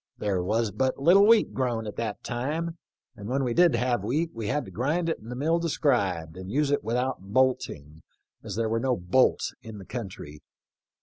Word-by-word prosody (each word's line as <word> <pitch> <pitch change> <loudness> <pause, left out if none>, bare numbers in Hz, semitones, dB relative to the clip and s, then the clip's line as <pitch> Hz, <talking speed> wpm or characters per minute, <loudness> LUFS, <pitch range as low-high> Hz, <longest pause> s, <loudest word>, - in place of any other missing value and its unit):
There 100 -3 -1
was 110 +4 0
but 130 +6 0
little 185 +8 +6
wheat 230 -1 +5
grown 120 -4 -1
at 105 - -6
that 110 -3 -4
time, 155 +7 -3 0.4
and 105 +1 -8
when 135 +2 0
we 120 -2 0
did 175 -3 +5
have 120 -3 0
wheat 155 +10 -1
we 115 -2 -5
had 145 +5 -1
to 95 - -11
grind 150 - 0
it 165 - -2
in 110 - -12
the 125 - -5
mill 160 +6 +1
described 100 - 0
and 95 0 -8
use 145 +3 +1
it 145 - +1
without 125 +4 -1
bolting, 95 - -1 0.4
as - - -6
there 115 0 0
were 115 +1 0
no 125 0 0
bolts 90 +9 +2
in 110 -2 -9
the 95 - -10
country. 90 - -7
120 Hz, 200 wpm, -27 LUFS, 105-145 Hz, 0.4 s, little